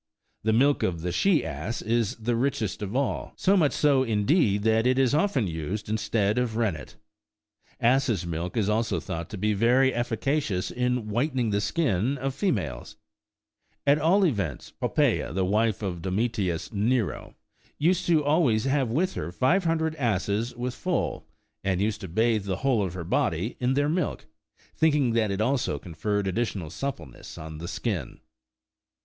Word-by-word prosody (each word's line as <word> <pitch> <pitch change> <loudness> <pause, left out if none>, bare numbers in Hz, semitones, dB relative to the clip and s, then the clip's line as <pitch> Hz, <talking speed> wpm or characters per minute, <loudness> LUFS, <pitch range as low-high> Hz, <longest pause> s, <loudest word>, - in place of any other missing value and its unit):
The 110 - +1
milk 140 +6 +3
of 85 -3 -1
the 90 +1 -2
she 160 - +2
ass 115 - -4
is 115 +1 0
the 115 +1 -1
richest 115 -6 -1
of 105 +3 -4
all, 130 -8 -1
so 195 +1 +3
much 155 -7 +3
so, 140 -3 +3
indeed, 105 - +2
that 110 +2 +3
it 130 0 +2
is 135 -1 +3
often 155 - +2
used 90 +5 -4
instead 105 0 +1
of 120 -3 -1
rennet. 95 - -2 0.8
Asses' 120 -7 +2
milk 85 +3 -4
is 105 -3 +1
also 110 +2 0
thought 80 0 -5
to 105 - -6
be 105 +3 +1
very 125 +5 +3
efficacious 120 -3 -1
in 125 -2 -1
whitening 125 0 0
the 100 0 +1
skin 125 - 0
of 135 +1 -2
females: 95 - -2 0.9
at 140 +1 +4
all 185 +6 +4
events, 100 - -2
Popptea,23 80 - +1
the 95 -1 +1
wife 105 +2 +1
of 90 -4 -3
Domitius 95 -2 -1
Nero, 110 +1 -1 0.4
used 175 +4 +1
always 145 -7 +3
to 135 - 0
have 135 -4 +1
with 175 +11 0
her 80 +3 -4
five 170 - +2
hundred 160 -1 0
asses 110 -1 -1
with 125 +1 -3
foal, 180 +6 -2 0.4
and 95 -2 0
used 105 +1 -1
to 95 - -5
bathe 110 +3 +1
the 95 -2 -2
whole 125 -6 +3
of 90 -2 -4
her 90 - -4
body 85 +5 0
in 125 +1 +1
their 145 +1 +2
milk, 165 +1 -1 0.5
thinking 150 -6 +3
that 110 -2 +2
it 100 +1 -1
alsp 120 - 0
con 85 - -9
ferred 105 +4 -1
additional 95 -4 -2
suppleness 85 - -6
on 80 0 -8
the 85 - -6
skin. 95 - -3
115 Hz, 165 wpm, -26 LUFS, 95-135 Hz, 0.9 s, at